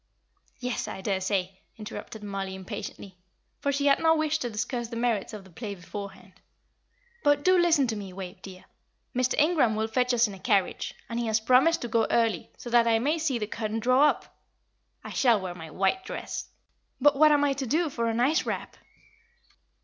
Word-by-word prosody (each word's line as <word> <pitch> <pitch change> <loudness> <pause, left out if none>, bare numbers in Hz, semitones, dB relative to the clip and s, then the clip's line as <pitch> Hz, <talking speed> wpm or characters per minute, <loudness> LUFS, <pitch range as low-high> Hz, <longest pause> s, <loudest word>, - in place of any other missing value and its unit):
"Yes, 250 -1 -3
I 190 - -6
daresay," 190 -1 -1 0.2
interrupted 215 0 -8
Mollie, 195 -2 -4
impatiently; 190 0 -8 0.4
for 280 - 0
she 280 +1 -1
had 280 -1 +5
no 320 0 +4
wish 310 0 0
to 245 - -3
discuss 240 +2 -3
the 230 - -7
merits 230 -3 0
of 210 -3 -8
the 190 - -17
play 205 +2 -6
beforehand. 195 +1 -9 0.9
"But 290 0 +3
do 370 0 +5
listen 340 -5 +4
to 230 -3 -2
me, 200 -2 -7
Wave, 185 0 -8
dear; 185 -2 -11 0.5
Mr. 255 +1 +1
Ingram 300 -8 +3
will 220 +1 0
fetch 250 +3 +1
us 240 -1 +3
in 205 - -8
a 195 - -10
carriage, 200 -4 0
and 235 0 -3
he 235 - -1
has 220 0 +2
promised 255 +9 +4
to - - -2
go 230 0 +1
early, 225 -7 +1
so 240 - -8
that 235 -1 +5
I 225 -1 +4
may 295 +8 0
see 295 -6 0
the 215 - -2
curtain 220 +1 -3
draw 255 +5 +4
up. - - -2 0.7
I - - -8
shall 235 -5 +3
wear 185 -2 -5
my 165 -2 -9
white 195 - 0
dress. - - -5 0.5
But 290 +2 +5
what 305 +2 +6
am 290 -1 +4
I 285 -1 +2
to 270 -1 -4
do 310 +5 +1
for 235 -2 -1
a - - -1
nice 265 +8 +2
wrap?" - - -5
230 Hz, 200 wpm, -27 LUFS, 200-275 Hz, 0.9 s, what